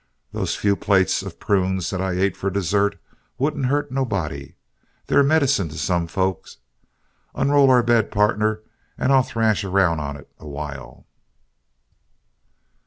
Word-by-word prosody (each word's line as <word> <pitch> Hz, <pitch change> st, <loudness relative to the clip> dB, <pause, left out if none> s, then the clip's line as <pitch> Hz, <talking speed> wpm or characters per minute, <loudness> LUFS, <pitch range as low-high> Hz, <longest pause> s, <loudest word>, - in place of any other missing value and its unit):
Those -, -, -2 dB
few 100 Hz, -1 st, +1 dB
plates 95 Hz, -2 st, +2 dB
of -, -, -9 dB
prunes 95 Hz, -3 st, 0 dB
that 95 Hz, -2 st, -3 dB
I 95 Hz, -1 st, -1 dB
ate 95 Hz, +2 st, 0 dB
for 100 Hz, -, -2 dB
dessert 100 Hz, +1 st, 0 dB, 0.4 s
wouldn't 140 Hz, 0 st, -1 dB
hurt 145 Hz, 0 st, -1 dB
nobody 90 Hz, -, -3 dB, 0.5 s
they're -, -, +3 dB
medicine 140 Hz, -, +2 dB
to 80 Hz, -, -9 dB
some 85 Hz, -2 st, -1 dB
folks. 95 Hz, 0 st, -3 dB, 0.8 s
Unroll 140 Hz, -1 st, +4 dB
our 125 Hz, -2 st, +5 dB
bed, 115 Hz, -2 st, +2 dB
pardner, 105 Hz, +1 st, +1 dB, 0.4 s
and 135 Hz, -, +1 dB
I'll 135 Hz, -, +6 dB
thrash 110 Hz, -4 st, 0 dB
around 95 Hz, -4 st, +1 dB
on 70 Hz, -1 st, -5 dB
it 70 Hz, -, -15 dB
awhile." 70 Hz, -2 st, -8 dB
100 Hz, 135 wpm, -22 LUFS, 90-125 Hz, 0.8 s, I'll